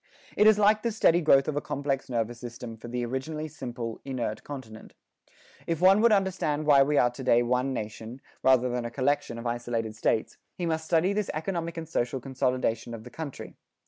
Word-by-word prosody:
It 210 Hz, -, +5 dB
is 215 Hz, -1 st, +6 dB
like 210 Hz, +1 st, +4 dB
the 235 Hz, -, -1 dB
steady 175 Hz, -5 st, +3 dB
growth 135 Hz, -4 st, +5 dB
of 155 Hz, -, -1 dB
a 145 Hz, -, 0 dB
complex 140 Hz, -2 st, -3 dB
nervous 120 Hz, -1 st, -2 dB
system 120 Hz, -1 st, -8 dB
for 110 Hz, -, -11 dB
the 120 Hz, 0 st, -2 dB
originally 150 Hz, +5 st, -4 dB
simple, 120 Hz, -5 st, -6 dB
inert 120 Hz, -5 st, -4 dB
continent. 120 Hz, -6 st, -9 dB, 0.7 s
If 165 Hz, -1 st, -1 dB
one 190 Hz, +3 st, +6 dB
would 235 Hz, 0 st, +5 dB
understand 185 Hz, -7 st, +1 dB
why 145 Hz, -2 st, +6 dB
we 145 Hz, +2 st, +2 dB
are 120 Hz, -, +4 dB
to 130 Hz, +2 st, -8 dB
day 120 Hz, -1 st, +4 dB
one 125 Hz, +2 st, 0 dB
nation, 110 Hz, +1 st, -6 dB, 0.2 s
rather 130 Hz, -1 st, +4 dB
than 125 Hz, -1 st, -2 dB
a 120 Hz, -, -3 dB
collection 130 Hz, -1 st, -1 dB
of 115 Hz, -, -7 dB
isolated 120 Hz, -2 st, -2 dB
states, 110 Hz, 0 st, 0 dB, 0.2 s
he 175 Hz, -, -2 dB
must 160 Hz, -1 st, -1 dB
study 170 Hz, +4 st, +2 dB
this 210 Hz, -1 st, -1 dB
economic 170 Hz, +1 st, -3 dB
and 165 Hz, -1 st, -5 dB
social 125 Hz, -4 st, -1 dB
consolidation 125 Hz, -3 st, -1 dB
of 110 Hz, -, -10 dB
the 125 Hz, -, -11 dB
country. 155 Hz, -4 st, -7 dB
130 Hz, 200 wpm, -27 LUFS, 120-160 Hz, 0.7 s, is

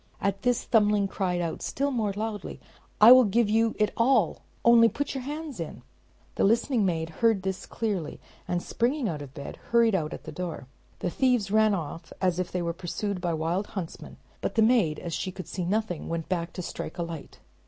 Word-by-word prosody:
At 195 Hz, 0 st, -1 dB
this, 245 Hz, 0 st, +1 dB
Thumbling 210 Hz, -3 st, +3 dB
cried 180 Hz, -2 st, -1 dB
out 165 Hz, -2 st, -3 dB
still 280 Hz, +1 st, -1 dB
more 220 Hz, -5 st, 0 dB
loudly, 210 Hz, +1 st, -5 dB, 0.4 s
"I 220 Hz, +3 st, +10 dB
will 255 Hz, 0 st, +10 dB
give 210 Hz, +1 st, +2 dB
you 225 Hz, 0 st, +2 dB
it 210 Hz, -1 st, +2 dB
all, 230 Hz, -6 st, +2 dB, 0.2 s
only 235 Hz, -1 st, +7 dB
put 285 Hz, +4 st, -3 dB
your 265 Hz, -, -3 dB
hands 295 Hz, -, -6 dB
in." 165 Hz, -, -6 dB, 0.5 s
The -, -, 0 dB
listening 230 Hz, +3 st, +3 dB
maid 160 Hz, -2 st, -2 dB
heard 225 Hz, -5 st, +3 dB
this 190 Hz, -1 st, -3 dB
clearly, 200 Hz, -9 st, -3 dB, 0.3 s
and 175 Hz, 0 st, -1 dB
springing 250 Hz, +2 st, 0 dB
out 155 Hz, -6 st, -3 dB
of 135 Hz, -2 st, -10 dB
bed, 140 Hz, -, -7 dB
hurried 230 Hz, -1 st, +4 dB
out 160 Hz, -5 st, 0 dB
at -, -, -7 dB
the -, -, -7 dB
door. 175 Hz, -6 st, -5 dB, 0.4 s
The 180 Hz, -, -1 dB
thieves 245 Hz, -6 st, +1 dB
ran 215 Hz, -1 st, +4 dB
off 165 Hz, -1 st, -6 dB
as 180 Hz, -2 st, +1 dB
if 185 Hz, -, -2 dB
they 180 Hz, -1 st, -1 dB
were 170 Hz, 0 st, -1 dB
pursued 185 Hz, +2 st, -4 dB
by 175 Hz, -, -1 dB
the 165 Hz, -, 0 dB
wild 170 Hz, +6 st, -1 dB
huntsman, 170 Hz, -4 st, -6 dB, 0.2 s
but -, -, -2 dB
the 225 Hz, -, +5 dB
maid, 220 Hz, -10 st, +3 dB
as 170 Hz, -, -6 dB
she 185 Hz, -, -2 dB
could 185 Hz, 0 st, -8 dB
see 180 Hz, -, -3 dB
nothing, 200 Hz, -3 st, -1 dB
went 165 Hz, -1 st, -3 dB
to 175 Hz, 0 st, -2 dB
strike -, -, -6 dB
a 170 Hz, -, -1 dB
light. 165 Hz, -3 st, -8 dB
200 Hz, 205 wpm, -27 LUFS, 175-230 Hz, 0.5 s, I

